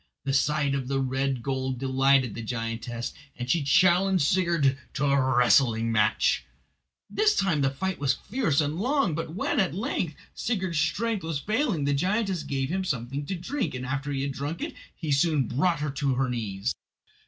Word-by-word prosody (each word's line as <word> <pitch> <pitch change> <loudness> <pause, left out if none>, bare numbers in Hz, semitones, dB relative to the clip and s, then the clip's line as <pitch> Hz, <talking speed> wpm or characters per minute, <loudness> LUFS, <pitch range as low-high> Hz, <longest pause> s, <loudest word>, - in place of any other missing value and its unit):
The 135 - -1
sight 145 +1 +2
of 135 -2 -2
the 135 0 0
red 135 -1 -1
gold 130 -1 -2
delighted 135 -2 +2
the 115 - -6
giantess, 115 +1 -4 0.2
and 120 - -4
she 165 +5 +2
challenged 180 +4 +4
Sigurd 170 -5 +2 0.2
to 145 - 0
a 135 -2 +2
wrestling 115 -1 +4
match. 105 -2 +2 0.6
This 425 0 +2
time 175 -7 +1
the 135 - +3
fight 190 +8 -3
was 135 -2 +2
fierce 180 - 0
and 150 +2 -2
long, 255 - +1
but 160 +1 -4
when 205 - 0
at 185 -5 +1
length 185 - -2 0.2
Sigurd's 190 -8 -1
strength 205 +6 0
was 160 -2 -2
failing 215 - 0
the 145 - +2
giantess 190 +4 0
gave 135 -2 -2
him 190 +3 -1
something 135 -2 -3
to 190 - -2
drink, 215 - -3
and 125 0 -4
after 135 +2 -3
he 135 -1 -1
had 140 - -2
drunk 145 +5 -4
it - - -4 0.2
he 155 -4 -4
soon 140 -2 +2
brought 155 +4 +1
her 150 -1 -1
to 140 -1 0
her 130 +1 +1
knees. 110 -3 -2
140 Hz, 185 wpm, -27 LUFS, 130-175 Hz, 0.6 s, challenged